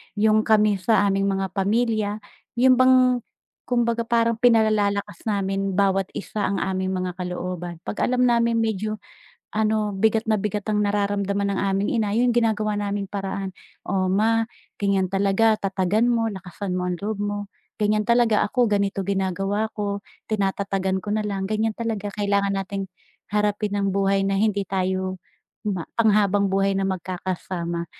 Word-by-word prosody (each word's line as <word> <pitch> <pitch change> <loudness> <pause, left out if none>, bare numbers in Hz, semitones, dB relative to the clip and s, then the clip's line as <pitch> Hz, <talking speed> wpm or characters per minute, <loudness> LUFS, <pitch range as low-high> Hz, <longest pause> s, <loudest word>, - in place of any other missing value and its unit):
yung 215 +1 +3
kami 210 -2 +4
sa 205 +2 +3
aming 195 0 +1
mga 195 -1 -1
pamilya, 215 +2 +1 0.4
yun 255 +1 +5
bang, 255 -1 +5 0.5
kumbaga 235 -1 +1
parang 230 0 +2
pinalalakas 215 -6 +2
namin 195 -1 -1
bawat 195 -1 +2
isa 210 +1 -4
ang 200 0 0
aming 190 -1 -1
mga 185 -1 -2
kalooban 180 -1 -5
'pag - - -4
alam 250 0 +2
namin 235 -1 +3
medyo 215 -1 -1 0.6
ano, 215 -1 +1
bigat 220 +3 +1
na 215 -2 +1
bigat 210 0 -2
ang 210 -1 +1
nararamdaman 200 -1 0
ng 195 - -2
aming 195 0 0
ina 220 -3 +1
yung 245 0 +3
ginagawa 215 -3 +1
naming 200 0 -2
paraan. 195 -1 -4 0.3
"O 185 -1 0
ma, 220 +4 +3 0.4
ganyan 200 -1 +2
talaga 195 +4 +2
tatagan 195 +4 +1
mo, 230 -1 +2
lakasan 190 0 -6
mo 180 0 -1
ang 180 - -2
loob 205 +2 -3
mo 205 0 -2 0.3
ganyan 210 0 +2
talaga 235 -2 +4
ako 245 +3 +2
ganito 200 -1 0
ginagawa 195 +2 -1
ko, 200 -1 -2 0.3
tinatatagan 195 -1 0
ko 205 - -4
na 215 - +1
lang 200 -2 -3
ganyan 215 +2 -1
talaga 220 -3 -3
kailangan 200 -1 +1
nating 195 0 -4 0.4
harapin 210 0 0
ang 200 -1 0
buhay 195 0 +2
na 195 - 0
hindi 200 0 +1
tayo 185 -1 -2 0.4
ma 195 -6 -3
pang-habang-buhay 200 -3 +2
na 195 0 0
magkakasama" 175 -2 -4
200 Hz, 150 wpm, -23 LUFS, 195-215 Hz, 0.6 s, yun